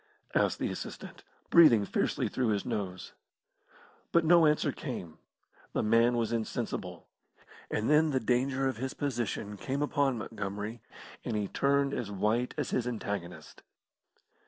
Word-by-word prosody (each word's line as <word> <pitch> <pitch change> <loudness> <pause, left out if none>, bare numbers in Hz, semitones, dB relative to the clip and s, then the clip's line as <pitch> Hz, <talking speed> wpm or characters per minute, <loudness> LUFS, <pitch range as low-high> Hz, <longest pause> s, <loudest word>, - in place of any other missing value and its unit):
asked - - +2
the - - -2
assistant, - - -8 0.3
breathing 120 -12 +7
fiercely - - 0
through 130 -2 -1
his 105 -2 0
nose. 95 -5 -4 1.0
But 170 -1 +3
no 170 -1 +6
answer 150 0 +2
came. 90 - -7 0.5
The - - 0
man 115 +2 +4
was 115 -1 0
insensible. 115 -2 -4 0.6
And 105 - -1
then 150 +2 +4
the 135 -3 +1
danger 130 +2 +1
of 130 -4 -2
his 130 +3 -4
position 120 -6 -3
came 135 +7 -2
upon 140 -3 +1
Montgomery, 105 +1 -5 0.4
and 115 - -3
he 105 -1 -1
turned 140 +3 +1
as 110 - -3
white 105 +5 0
as - - -2
his 125 -1 0
antagonist. 95 -8 -5
120 Hz, 140 wpm, -30 LUFS, 105-135 Hz, 1.0 s, breathing